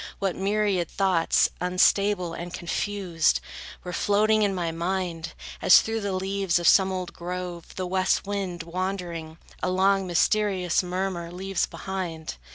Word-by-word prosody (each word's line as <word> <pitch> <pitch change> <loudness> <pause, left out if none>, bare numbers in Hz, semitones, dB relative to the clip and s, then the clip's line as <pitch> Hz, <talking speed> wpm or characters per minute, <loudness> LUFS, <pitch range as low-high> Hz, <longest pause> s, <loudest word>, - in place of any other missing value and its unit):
What 195 -3 -1
myriad 200 -3 0
thoughts, 185 -4 +2
unstable 180 0 +2
and 175 +1 -6
confused, 175 - 0 0.4
Were 180 - -6
floating 215 +3 +3
in 200 -2 +2
my 170 -2 -1
mind! 170 -1 -3 0.3
As 185 - +8
through 225 0 -3
the 200 -1 -2
leaves 190 -1 0
Of 175 - 0
some 190 -1 +6
old 185 -2 -4
grove, 175 -1 -6
the 185 - -3
west 185 +2 +1
wind, 195 -4 -3
wandering, 170 -2 -4 0.2
A - - 0
long, 190 +1 +2
mysterious 185 0 +2
murmur 180 -1 -3
leaves 190 0 -2
behind. 175 - -5
185 Hz, 140 wpm, -26 LUFS, 175-195 Hz, 0.4 s, As